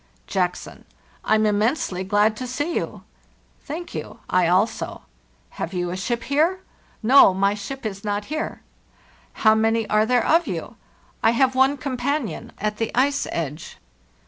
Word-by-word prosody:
" -, -, -37 dB
Jackson: 180 Hz, -1 st, -2 dB, 0.4 s
'I'm 215 Hz, 0 st, +3 dB
immensely 210 Hz, -, 0 dB
glad 210 Hz, +3 st, +2 dB
to 255 Hz, -, -5 dB
see 290 Hz, +7 st, -2 dB
you.' -, -, -3 dB, 0.6 s
"«Thank 330 Hz, +4 st, -6 dB
you; -, -, -6 dB
I 180 Hz, -1 st, +3 dB
also.' 185 Hz, +6 st, 0 dB, 0.2 s
"* -, -, -37 dB
Have 170 Hz, -, -3 dB
you 175 Hz, -1 st, -1 dB
a -, -, -3 dB
ship 235 Hz, +5 st, -2 dB
here 325 Hz, +7 st, +1 dB
?' -, -, -34 dB
"* -, -, -36 dB
No; 195 Hz, -9 st, +8 dB
my 195 Hz, +1 st, +2 dB
ship 225 Hz, +6 st, -7 dB
is 200 Hz, -2 st, -4 dB
not 205 Hz, 0 st, -2 dB
here." 310 Hz, +5 st, -4 dB, 0.4 s
"* -, -, -31 dB
How 215 Hz, -, +8 dB
many 225 Hz, 0 st, +1 dB
are 215 Hz, +1 st, +3 dB
there 250 Hz, -1 st, +2 dB
of 335 Hz, +2 st, +3 dB
you?' -, -, -5 dB, 0.5 s
"*T 225 Hz, -, +5 dB
have 260 Hz, +2 st, +3 dB
one 265 Hz, +2 st, +3 dB
companion 260 Hz, -, -3 dB
at 210 Hz, +1 st, -2 dB
the 225 Hz, 0 st, -1 dB
ice 280 Hz, +2 st, +2 dB
edge. 155 Hz, -1 st, -5 dB
220 Hz, 170 wpm, -23 LUFS, 195-270 Hz, 0.6 s, No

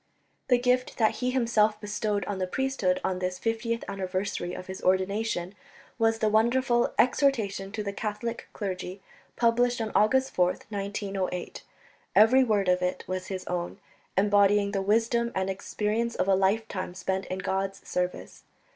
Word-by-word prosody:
The 250 Hz, -, +5 dB
gift 250 Hz, +1 st, +1 dB
that 220 Hz, -2 st, +2 dB
he 250 Hz, -, 0 dB
himself 230 Hz, -4 st, +2 dB
bestowed 210 Hz, -1 st, -2 dB
on 200 Hz, -1 st, -3 dB
the 185 Hz, -, -1 dB
priesthood 270 Hz, +5 st, 0 dB
on 185 Hz, -1 st, -1 dB
this 180 Hz, 0 st, -2 dB
fiftieth 230 Hz, +1 st, -2 dB
anniversary 185 Hz, -2 st, -3 dB
of 185 Hz, -, -7 dB
his 190 Hz, 0 st, -7 dB
ordination 190 Hz, 0 st, 0 dB, 0.5 s
was 225 Hz, 0 st, +3 dB
the 220 Hz, -, +1 dB
wonderful 240 Hz, +3 st, +2 dB
Exhortation 225 Hz, -8 st, +2 dB
to 215 Hz, 0 st, -4 dB
the 200 Hz, -1 st, -3 dB
Catholic 215 Hz, +3 st, -4 dB
Clergy, 185 Hz, -2 st, -5 dB, 0.4 s
published 240 Hz, +1 st, +2 dB
on 220 Hz, -2 st, -2 dB
August 260 Hz, +6 st, +3 dB
4th, 180 Hz, 0 st, +1 dB
1908. 195 Hz, -3 st, -3 dB, 0.5 s
Every 245 Hz, +5 st, +7 dB
word 210 Hz, -5 st, +1 dB
of 180 Hz, 0 st, +3 dB
it 180 Hz, 0 st, -1 dB
was 185 Hz, 0 st, -4 dB
his 190 Hz, -1 st, -5 dB
own, 175 Hz, -1 st, -3 dB, 0.4 s
embodying 205 Hz, 0 st, +4 dB
the 195 Hz, -1 st, -1 dB
wisdom 230 Hz, +3 st, +1 dB
and 190 Hz, 0 st, 0 dB
experience 215 Hz, +4 st, -2 dB
of 185 Hz, -, 0 dB
a 195 Hz, -, +4 dB
lifetime 190 Hz, -1 st, 0 dB
spent 190 Hz, +1 st, -2 dB
in 185 Hz, -, -3 dB
God's 195 Hz, 0 st, -3 dB
service. 180 Hz, 0 st, -3 dB
205 Hz, 155 wpm, -27 LUFS, 190-230 Hz, 0.5 s, Every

